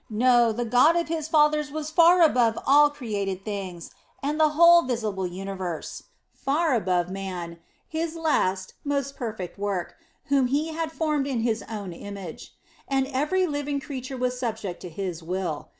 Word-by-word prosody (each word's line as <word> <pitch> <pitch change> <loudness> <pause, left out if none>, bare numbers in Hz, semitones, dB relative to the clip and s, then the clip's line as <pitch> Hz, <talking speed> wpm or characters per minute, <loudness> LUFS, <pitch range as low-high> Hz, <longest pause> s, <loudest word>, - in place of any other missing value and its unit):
No, 240 +1 +4
the 240 +2 -2
God 250 +8 +5
of 340 -1 0
his 320 -2 -2
fathers 300 -1 +3
was 310 0 -4
far 340 +2 +6
above 240 -7 +3
all 295 +2 +6
created 200 -9 -4
things 190 -5 -5 0.3
and 295 +3 -1
the 310 -1 +5
whole 340 0 +8
visible 215 - -2
universe, 185 -2 -6 0.3
far 305 +2 0
above 180 -5 0
man, 180 -3 -5 0.3
His 320 +1 -3
last, 195 - 0
most 280 -1 -2
perfect 215 -7 -6
work, 200 -4 -2 0.3
whom 275 -2 +2
He 290 +5 0
had 320 0 -3
formed 305 -3 -1
in 255 -5 -1
His 225 -1 0
own 205 -5 -5
image; 195 -1 -9 0.3
and 270 -1 +1
every 300 +8 +1
living 290 -3 -2
creature 265 -2 -6
was 250 0 -1
subject 220 -7 -4
to 180 - -7
His 180 -1 -5
will. 175 -2 -4
245 Hz, 160 wpm, -25 LUFS, 195-295 Hz, 0.3 s, whole